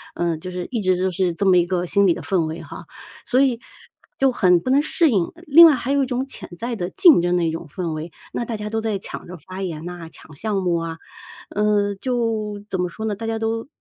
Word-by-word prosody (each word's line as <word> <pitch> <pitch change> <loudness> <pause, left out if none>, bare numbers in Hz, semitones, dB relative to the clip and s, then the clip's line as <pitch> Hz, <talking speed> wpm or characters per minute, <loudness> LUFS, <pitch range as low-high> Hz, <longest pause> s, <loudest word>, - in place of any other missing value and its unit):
嗯， 170 -2 -1
就 185 - -7
是 180 -1 -5
一 235 - -1
直 185 -1 +2
就 185 +1 0
是 180 0 0
这 200 +4 -2
么 185 -1 +5
一 175 - +4
个 180 -1 -1
心 200 +2 +3
理 175 - +4
的 - - -7
氛 180 -4 0
围 160 +2 -5
哈， - - -10 0.4
所 255 +1 +2
以 255 -4 +2 0.6
就 270 -1 +3
很 180 -7 +4
不 255 - -2
能 280 +2 +5
适 310 +1 +3
应。 190 -6 +1
另 330 +3 +9
外 300 - +4
还 255 +1 -3
有 280 0 +3
一 - - 0
种 255 +1 -2
潜 270 - -9
在 235 +1 -3
的 180 -4 -3
竞 340 - +6
争 175 0 +1
的 175 - +1
一 160 - 0
种 165 0 -6
氛 175 +1 -4
围， 155 +2 -6 0.2
那 - - -2
大 225 -2 -4
家 210 0 -5
都 225 +1 -2
在 220 -2 -1
抢 195 - -8
着 180 0 -8
发 185 +5 -9
言 165 -4 -5
呐、 175 -2 -7
抢 155 - -15
项 210 +8 -3
目 175 -2 +1
啊， 165 -1 -4 0.5
呃， 205 -1 +1
就 220 -3 -2
怎 190 - -3
么 180 - -1
说 220 +5 -6
呢？ 210 -2 -1
大 225 +2 -6
家 225 0 -1
都 225 +2 -2
195 Hz, 280 characters per minute, -22 LUFS, 175-230 Hz, 0.6 s, 另